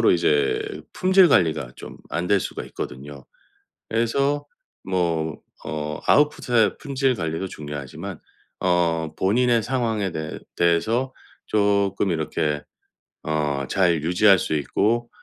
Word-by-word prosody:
결론적으로 -, -, +5 dB
이제 430 Hz, 0 st, +2 dB, 0.3 s
품질 185 Hz, -1 st, +5 dB
관리가 80 Hz, -, +2 dB
좀 -, -, -10 dB
안 90 Hz, -, -2 dB
될 100 Hz, -, +4 dB
수가 -, -, -5 dB
있거든요. 70 Hz, 0 st, -8 dB, 0.7 s
그래서 140 Hz, +6 st, +1 dB, 0.4 s
뭐 85 Hz, -4 st, -1 dB, 0.3 s
어 75 Hz, 0 st, -4 dB
아웃풋의 135 Hz, -, +3 dB
품질 135 Hz, -2 st, 0 dB
관리도 80 Hz, -2 st, -3 dB
중요하지만 75 Hz, -5 st, -7 dB, 0.4 s
어 85 Hz, -3 st, +1 dB
본인의 120 Hz, +4 st, +2 dB
상황에 110 Hz, -6 st, -1 dB
대해 80 Hz, -1 st, -5 dB, 0.2 s
대해서 110 Hz, +10 st, +1 dB, 0.3 s
조금 100 Hz, -2 st, +1 dB
이렇게 80 Hz, -2 st, -1 dB, 0.6 s
어 75 Hz, -3 st, -1 dB
잘 85 Hz, -5 st, +2 dB
유지할 95 Hz, +4 st, +5 dB
수 -, -, -2 dB
있고 115 Hz, -, 0 dB
95 Hz, 255 characters per minute, -23 LUFS, 80-120 Hz, 0.7 s, 결론적으로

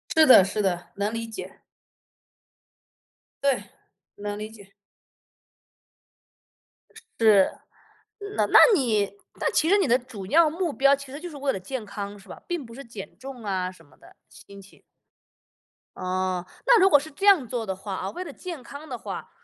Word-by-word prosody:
是 315 Hz, -1 st, +7 dB
的 225 Hz, -7 st, +9 dB
是 210 Hz, +2 st, -2 dB
的， 175 Hz, -3 st, -1 dB
能 205 Hz, +2 st, -2 dB
理 230 Hz, 0 st, -3 dB
解。 225 Hz, -, -9 dB, 1.8 s
对， 275 Hz, -2 st, +2 dB, 0.5 s
能 205 Hz, 0 st, -5 dB
理 215 Hz, +1 st, -6 dB
解。 200 Hz, -3 st, -16 dB, 2.5 s
是。 210 Hz, -4 st, +5 dB, 0.9 s
那 -, -, +3 dB
那 -, -, +5 dB, 0.2 s
你 220 Hz, -, +1 dB, 0.3 s
那 -, -, 0 dB
其 315 Hz, -, +2 dB
实 405 Hz, -, +5 dB
你 390 Hz, -, +2 dB
的 245 Hz, +1 st, +4 dB
主 230 Hz, -6 st, -9 dB
要 320 Hz, +5 st, +5 dB
目 340 Hz, 0 st, -2 dB
标 275 Hz, +1 st, +4 dB
其 275 Hz, -1 st, -11 dB
实 285 Hz, -, -7 dB
就 350 Hz, +1 st, -7 dB
是 300 Hz, -, -11 dB
为 275 Hz, 0 st, 0 dB
了 190 Hz, -, -4 dB
健 240 Hz, +3 st, -6 dB
康 200 Hz, 0 st, -6 dB
是 195 Hz, -, -18 dB
吧？ -, -, -10 dB
并 345 Hz, -7 st, -3 dB
不 230 Hz, -, -13 dB
是 275 Hz, +3 st, -9 dB
减 200 Hz, -4 st, -10 dB
重 260 Hz, -3 st, -9 dB
啊 185 Hz, -2 st, -2 dB
什 185 Hz, -, -19 dB
么 130 Hz, -2 st, -24 dB
的。 -, -, -19 dB
心 200 Hz, -1 st, -14 dB
情。 195 Hz, -, -19 dB, 1.1 s
哦， 185 Hz, -1 st, -2 dB, 0.2 s
那 480 Hz, -3 st, +6 dB
如 380 Hz, +1 st, +6 dB
果 290 Hz, -, +7 dB
是 315 Hz, +2 st, -10 dB
这 390 Hz, +8 st, -4 dB
样 360 Hz, -, +6 dB
做 235 Hz, -2 st, -3 dB
的 190 Hz, -1 st, -3 dB
话 195 Hz, +1 st, -7 dB
啊， 190 Hz, -, -4 dB
为 365 Hz, -, -6 dB
了 310 Hz, -, -8 dB
健 335 Hz, -4 st, -8 dB
康 285 Hz, +5 st, -10 dB
的 250 Hz, -3 st, -5 dB
话， -, -, -7 dB
230 Hz, 190 characters per minute, -25 LUFS, 200-285 Hz, 2.5 s, 的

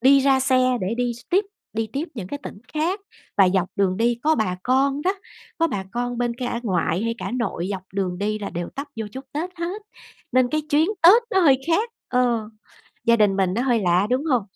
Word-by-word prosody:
đi 275 Hz, +3 st, +6 dB
ra 270 Hz, -1 st, +3 dB
xe 255 Hz, -1 st, +3 dB
để 190 Hz, +5 st, -1 dB
đi 245 Hz, -1 st, 0 dB
s 240 Hz, -, -12 dB
tiếp, 390 Hz, +3 st, +3 dB, 0.3 s
đi 225 Hz, 0 st, -1 dB
tiếp 300 Hz, +6 st, -3 dB
những 200 Hz, -6 st, -5 dB
cái 285 Hz, -, -4 dB
tỉnh -, -, -8 dB, 0.2 s
khác. 345 Hz, +7 st, 0 dB, 0.4 s
Và 195 Hz, -2 st, +6 dB
dọc 185 Hz, -1 st, +2 dB
đường 190 Hz, -2 st, +2 dB
đi 235 Hz, +1 st, +1 dB
có 315 Hz, +1 st, +4 dB
bà 185 Hz, -5 st, 0 dB
con 275 Hz, +3 st, +2 dB
đó, 375 Hz, +2 st, +1 dB, 0.4 s
có 330 Hz, -, +4 dB
bà 200 Hz, -10 st, -3 dB
con 245 Hz, 0 st, -2 dB
bên 240 Hz, -1 st, 0 dB
cả 245 Hz, -1 st, -3 dB
ngoại 180 Hz, -2 st, 0 dB
hay 230 Hz, 0 st, -1 dB
cả -, -, -4 dB
nội 230 Hz, -8 st, -2 dB
dọc 190 Hz, -2 st, -4 dB
đường 185 Hz, -2 st, -1 dB
đi 215 Hz, +1 st, -1 dB
là 200 Hz, -, -5 dB
đều 175 Hz, 0 st, -4 dB
tấp 280 Hz, +2 st, -4 dB
vô 220 Hz, -1 st, -3 dB
chúc 265 Hz, +1 st, -7 dB
Tết 325 Hz, +5 st, -3 dB
hết, 360 Hz, +5 st, -4 dB, 0.5 s
nên 255 Hz, -1 st, +4 dB
cái 310 Hz, +3 st, 0 dB
chuyến 310 Hz, +5 st, +4 dB
Tết 405 Hz, +8 st, +8 dB
nó 380 Hz, -, +3 dB
hơi 275 Hz, -6 st, +5 dB
khác, 425 Hz, +8 st, +1 dB, 0.2 s
ờ. 240 Hz, -4 st, +1 dB, 0.5 s
Gia 235 Hz, 0 st, +5 dB
đình 205 Hz, -3 st, +3 dB
mình 190 Hz, -1 st, +1 dB
nó 240 Hz, -, 0 dB
hơi 245 Hz, -3 st, +2 dB
lạ, 180 Hz, +2 st, +3 dB
đúng 260 Hz, +4 st, +1 dB
hông? 255 Hz, -8 st, +2 dB
245 Hz, 230 wpm, -23 LUFS, 205-280 Hz, 0.5 s, Tết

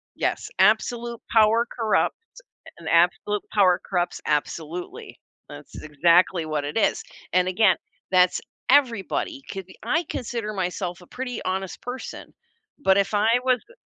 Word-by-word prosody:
Yes, -, -, -2 dB
absolute 235 Hz, -1 st, +2 dB
power 225 Hz, +1 st, +4 dB
corrupts, 225 Hz, -3 st, 0 dB, 0.6 s
and 165 Hz, -, -7 dB
absolute 180 Hz, +5 st, +2 dB
power 185 Hz, -4 st, +4 dB
corrupts 175 Hz, -2 st, -2 dB
absolutely. 160 Hz, +3 st, -3 dB, 0.3 s
That's -, -, -11 dB
exactly 170 Hz, +3 st, +3 dB
what 150 Hz, -2 st, -2 dB
it 145 Hz, +9 st, -2 dB
is, -, -, +1 dB, 0.3 s
and 180 Hz, 0 st, +3 dB
again, 190 Hz, +1 st, +4 dB, 0.3 s
that's 180 Hz, -1 st, +4 dB, 0.3 s
everybody, 275 Hz, -, +1 dB
c 195 Hz, -1 st, -5 dB, 0.2 s
I 330 Hz, +3 st, 0 dB
consider 230 Hz, -5 st, -4 dB
myself 180 Hz, -1 st, -3 dB
a 180 Hz, -, -15 dB
pretty 250 Hz, -2 st, -5 dB
honest 190 Hz, 0 st, -3 dB
person, 250 Hz, +1 st, -7 dB, 0.5 s
but 190 Hz, -9 st, +3 dB
if 200 Hz, +1 st, +1 dB
I 210 Hz, +1 st, +2 dB, 0.2 s
was 255 Hz, -2 st, +2 dB
a -, -, -16 dB
195 Hz, 135 wpm, -24 LUFS, 175-235 Hz, 0.6 s, power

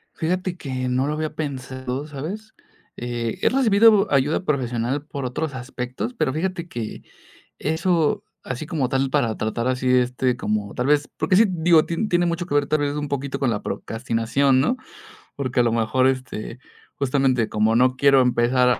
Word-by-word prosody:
Fíjate 180 Hz, +2 st, -2 dB
que, 130 Hz, -4 st, -3 dB
no 130 Hz, +2 st, +1 dB
lo 150 Hz, -, -1 dB
había 155 Hz, 0 st, -3 dB
pensado, 130 Hz, -1 st, -4 dB
¿sabes?, 175 Hz, +10 st, -7 dB, 0.5 s
eh 120 Hz, -2 st, -3 dB
he -, -, +3 dB
recibido 220 Hz, -5 st, +4 dB
ayuda 145 Hz, +5 st, +2 dB
profesional 130 Hz, -2 st, -1 dB
por 140 Hz, -2 st, -6 dB
otros 135 Hz, +3 st, -3 dB
aspectos, 130 Hz, -, -5 dB
pero 130 Hz, -, 0 dB
fíjate 175 Hz, +2 st, -2 dB
que, 115 Hz, -9 st, -6 dB, 0.6 s
eso 160 Hz, 0 st, +1 dB, 0.2 s
así 125 Hz, +4 st, -4 dB
como 150 Hz, -6 st, -1 dB
tal, 135 Hz, +1 st, 0 dB
para 120 Hz, -6 st, +1 dB
tratar 115 Hz, +2 st, -2 dB
así, 130 Hz, 0 st, 0 dB
este, 125 Hz, 0 st, +2 dB
como 105 Hz, -3 st, -2 dB
tal 125 Hz, -, -1 dB
vez 145 Hz, 0 st, +2 dB
porque -, -, +1 dB
sí, 220 Hz, -, +7 dB
digo, 170 Hz, -3 st, +4 dB
ti 170 Hz, +6 st, -1 dB
tiene 175 Hz, -1 st, +2 dB
mucho 170 Hz, +1 st, -2 dB
que 160 Hz, -, -3 dB
ver, 145 Hz, -1 st, +3 dB
tal 155 Hz, -, +1 dB
vez, 145 Hz, 0 st, 0 dB
un 145 Hz, 0 st, -3 dB
poquito 140 Hz, -1 st, -3 dB
con 135 Hz, -3 st, +2 dB
la 105 Hz, -2 st, -2 dB
procrastinación, 120 Hz, +5 st, 0 dB
¿no?, 205 Hz, -, +1 dB, 0.6 s
porque 130 Hz, -3 st, +1 dB
a -, -, +3 dB
lo 120 Hz, -, +2 dB
mejor, 115 Hz, +3 st, +2 dB
este, 130 Hz, -3 st, -3 dB, 0.4 s
justamente, 130 Hz, -4 st, +1 dB
como 110 Hz, +1 st, +2 dB
no 125 Hz, +1 st, +3 dB
quiero 140 Hz, 0 st, +5 dB
empezar 125 Hz, 0 st, +3 dB
135 Hz, 175 wpm, -23 LUFS, 125-155 Hz, 0.6 s, sí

